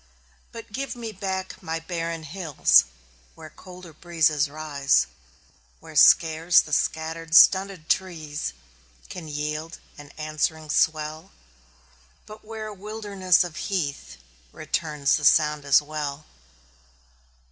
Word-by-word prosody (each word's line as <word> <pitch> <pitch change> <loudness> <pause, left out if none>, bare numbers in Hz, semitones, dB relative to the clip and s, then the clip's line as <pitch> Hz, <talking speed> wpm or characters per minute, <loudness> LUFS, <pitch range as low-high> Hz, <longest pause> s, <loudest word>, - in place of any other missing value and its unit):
But 230 -2 -11
give 270 +2 -4
me 230 -2 -6
back 190 -2 -5
my 165 0 -4
barren 165 -1 -5
hills 155 - +3 0.5
Where 155 -2 -12
colder 180 -3 -13
breezes 155 -3 0
rise; 145 - +1 0.7
Where - - -14
scarce 165 +2 +5
the 150 - -3
scattered, 160 +2 -1
stunted 190 -3 +5
trees 160 -5 -2 0.6
Can 170 -3 -8
yield 150 +2 -4 0.2
an 145 -1 -12
answering 155 0 -2
swell, 155 +2 0 1.0
But 215 +1 -13
where 220 0 -7
a 215 - -7
wilderness 200 -3 0
of 175 -3 -8
heath 145 - -4 0.3
Returns 155 -2 -1
the 150 - -7
sound 150 0 +3
as 140 +1 +4
well. 150 -1 -5
160 Hz, 115 wpm, -24 LUFS, 150-185 Hz, 1.0 s, scarce